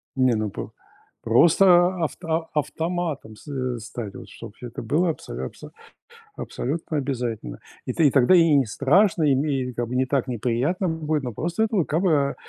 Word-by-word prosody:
Не, 130 -3 +3
ну, 110 -1 -1
по - - -7 0.5
просто 175 - +5
авто 165 +1 -2
автоматом 155 -5 -3
с 105 - -18
э, 130 -3 -3
стать, 110 -2 -7
вот - - -10
чтоб 100 - -11
это 120 -1 -7
было 165 +9 +1
абсо 160 - -6
абсо - - -9 0.7
абсолютно 155 +4 -4
обязательно. 120 - -3 0.3
И - - -2
ты 155 - +4
и - - +2
тогда 135 +7 +5
и 165 -3 +5
не 135 -3 +4
страшно, 160 - +2
и 140 -3 +4
ме 135 -3 -1
как 120 -1 -3
бы 125 - -4
не 130 - +2
так 135 -1 0
неприятно 125 - -1
будет, 155 -3 -1
но 120 -3 -4
просто 170 - -1
это 210 -6 +1
как 160 +5 -1
бы 145 -6 +2
140 Hz, 180 wpm, -24 LUFS, 125-165 Hz, 0.7 s, просто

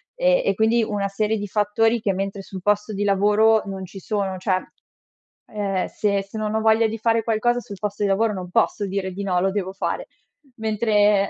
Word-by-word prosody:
e - - +3
e - - +3
quindi 225 +2 +3
una 205 -2 -1
serie 215 +2 -1
di 205 - -4
fattori 225 +3 +1
che 200 - +1
mentre 195 +1 -3
sul 190 -1 -9
posto 210 +2 +1
di 205 +1 -1
lavoro 210 +2 +4
non 195 -1 -5
ci 195 +2 -10
sono. 195 -2 -2
Cioè, 185 0 0 0.9
ehm, 200 -3 -1
se 200 -2 0
se 195 +3 -9
non 215 0 -2
ho 220 - +1
voglia 220 +1 +4
di 225 +1 -4
fare 225 +1 +2
qualcosa 240 +2 +1
sul 205 -5 -9
posto 210 0 -3
di 205 - +2
lavoro 215 +3 +2
non 185 -3 -6
posso 205 +3 +1
dire 190 -1 -3
di 195 +2 -5
no, 185 -3 0
lo 195 +1 +2
devo 190 -2 -2
fare. 350 - -3 0.5
Mentre 210 -2 +2
205 Hz, 205 wpm, -23 LUFS, 195-220 Hz, 0.9 s, lavoro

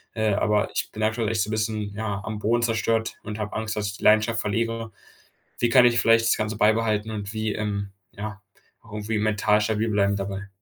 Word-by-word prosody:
äh, 110 -2 +1
aber 105 +1 +1
ich - - -2
bin 110 - -4
aktuell 110 0 0
echt 110 -2 0
so - - -5
'n - - -3
bisschen, 110 -1 -2
ja, 105 -2 -3
am 110 -1 -5
Boden 115 +3 +1
zerstört 115 -1 0
und 105 0 -6
habe 105 -1 -4
Angst, 110 -1 -3
dass 105 -1 -2
ich 100 - -5
die - - -12
Leidenschaft 110 +2 +4
verliere. 115 +1 -2 0.7
Wie 120 - +1
kann 125 -2 +7
ich 120 -1 +3
vielleicht 115 0 +4
das - - +3
Ganze 110 0 -2
beibehalten 110 0 +2
und 105 -1 -5
wie, 110 -1 -2
ähm 100 -2 -3 0.2
ja, 100 -1 -7 0.4
auch 110 - -17
irgendwie 105 +1 -2
mental 105 0 +2
stabil 110 +1 0
bleiben 100 -1 +2
dabei. 100 0 -5
110 Hz, 215 wpm, -25 LUFS, 105-110 Hz, 0.7 s, kann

